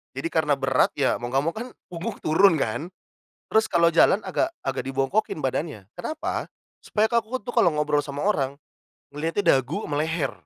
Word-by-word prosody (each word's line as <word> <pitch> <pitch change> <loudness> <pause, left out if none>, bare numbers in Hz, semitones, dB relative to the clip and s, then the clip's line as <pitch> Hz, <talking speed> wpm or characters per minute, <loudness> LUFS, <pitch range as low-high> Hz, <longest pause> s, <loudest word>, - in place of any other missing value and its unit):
jadi 135 +5 -3
karena 155 -3 +2
berat, 135 -1 +2
ya 140 -2 +1
mau 120 +1 -6
nggak 135 - +3
mau 165 - 0
kan, 245 +2 -6 0.2
punggung 180 +5 -5
turun 185 +5 +5
kan, 155 - -3 0.5
terus 220 0 +2
kalau 170 -1 +3
jalan 180 +4 +5
agak 330 - 0 0.2
agak 135 -1 -2
dibongkokin 135 +12 0
badannya. 135 - -3
Kenapa? 315 0 -4 0.3
Supaya 215 0 +1
kan 235 0 +2
aku 230 +4 -4
tuh 245 - -5
kalau 175 - +5
ngobrol 150 -1 +2
sama 145 +3 -5
orang, 140 -9 0 0.5
ngelihatnya 165 +7 -2 0.2
dagu 165 - -4
ama 145 -1 -2
leher. 155 -4 -1
160 Hz, 180 wpm, -25 LUFS, 135-200 Hz, 0.5 s, turun